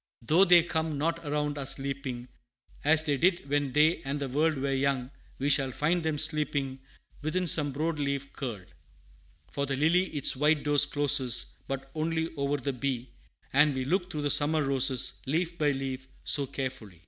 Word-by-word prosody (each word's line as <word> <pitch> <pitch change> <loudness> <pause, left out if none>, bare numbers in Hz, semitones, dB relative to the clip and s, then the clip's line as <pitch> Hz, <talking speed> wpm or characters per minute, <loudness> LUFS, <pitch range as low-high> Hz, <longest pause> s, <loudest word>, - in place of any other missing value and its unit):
Though 165 +11 +4
they 175 -2 +6
come 160 -3 -2
not 165 +3 -1
around 150 0 -2
us 135 0 +1
leaping, 135 -3 -5 0.6
As 155 +1 +4
they 145 -3 0
did 170 -2 +1
when 145 -1 0
they 155 +5 +3
and 140 +2 -4
the 140 - -3
world 155 +4 +1
Were 135 0 -2
young, 135 -1 -1 0.3
we 135 - -2
shall 140 -2 +4
find 155 +7 0
them 160 -2 -1
sleeping 145 -3 -1 0.4
Within 180 +5 -1
some 150 -3 +4
broad 155 +3 -2
leaf 140 -1 -3
curled; 110 -9 -7 0.8
For 140 0 -2
the 135 - -1
lily 165 +6 +3
its 145 -7 +2
white 150 +2 +2
doors 145 -1 +5
closes 135 -5 +1
But 135 0 -5
only 160 +1 -2
over 140 0 -1
the 140 0 -3
bee, 125 -1 -3 0.4
And 145 0 +4
we 130 -1 -2
looked 180 +4 -1
through 150 -2 -4
the 145 - +1
summer 150 +2 +2
roses, 135 -2 +2
Leaf 170 +4 -1
by 150 -1 +2
leaf, 135 -1 -4 0.2
so 140 -2 +1
carefully. 115 - -6
145 Hz, 180 wpm, -28 LUFS, 135-155 Hz, 0.8 s, they